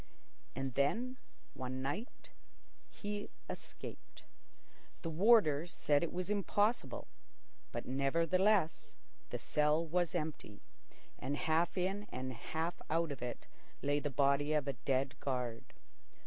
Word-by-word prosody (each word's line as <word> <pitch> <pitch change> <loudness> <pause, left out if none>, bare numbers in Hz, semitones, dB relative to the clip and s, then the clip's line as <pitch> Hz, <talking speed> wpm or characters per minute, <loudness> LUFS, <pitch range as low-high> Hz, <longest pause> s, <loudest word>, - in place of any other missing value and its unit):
And 135 0 -2
then, 235 - +1 0.4
one 130 0 -4
night, 180 - -4 0.6
he 205 0 -4 0.2
escaped. - - -8 0.8
The 165 - -2
warders 175 -4 +5
said 145 -4 +2
it 170 - -1
was 185 +3 -2
impossible, 205 - +1 0.6
but - - -4
nevertheless 165 +7 +2 0.3
the - - -2
cell 150 +2 +2
was 175 +1 +1
empty, 150 -9 -3 0.6
and 140 +3 -2
half 165 +4 +2
in 195 +3 0 0.3
half 160 +8 -3
out 165 0 +2
of 140 - -6
it 120 -1 -4 0.4
lay 145 +1 +3
the 145 - -2
body 140 +2 +3
of 150 -2 +1
a 140 - +1
dead 135 +3 0
guard. 125 -4 -2
155 Hz, 120 wpm, -36 LUFS, 140-180 Hz, 0.8 s, warders